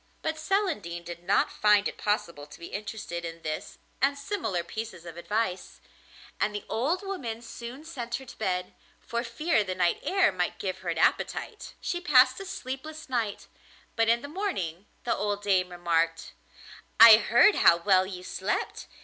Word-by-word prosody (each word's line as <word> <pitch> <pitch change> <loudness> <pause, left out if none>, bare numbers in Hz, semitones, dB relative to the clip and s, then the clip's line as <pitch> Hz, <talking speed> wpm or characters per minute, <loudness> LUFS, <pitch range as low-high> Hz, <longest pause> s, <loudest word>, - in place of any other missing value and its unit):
But 315 0 -1
Celandine 310 - -1
did 170 0 -8
not 195 +3 +2
find 210 -1 +4
it - - -6
possible 170 -8 -2
to - - -13
be 170 - -8
interested 205 -4 -5
in 165 0 -7
this 155 0 -5 0.2
and 280 +1 +2
similar 280 - -2
pieces 185 -2 -7
of 170 -1 -9
advice. 190 +1 -3 0.6
And 210 0 0
the 205 - -5
old 310 - -1
woman 245 - -5
soon 240 +5 -9
sent 240 -8 -5
her 265 - -6
to - - -12
bed, 180 -4 -2 0.3
for 235 0 -3
fear 235 +1 +1
the 185 -2 -4
night 175 -2 +1
air 385 - +3
might 180 -1 -2
give 185 -1 -4
her 185 -2 -5
an 165 - -2
appetite. 435 - -1
She 350 - -3
passed 260 -6 +5
a 390 - -7
sleepless 305 -2 -7
night; 230 -5 -2 0.5
but 225 -1 +2
in 235 +2 +3
the - - -5
morning 210 - -3 0.2
the 240 - 0
old 205 0 -2
dame 185 -3 +2
remarked: 170 -2 -1 0.7
'I 225 -1 +11
heard 240 - +5
how 170 - +6
well 185 +1 +3
you 180 -2 -7
slept. 190 +2 -3
210 Hz, 175 wpm, -28 LUFS, 180-265 Hz, 0.7 s, I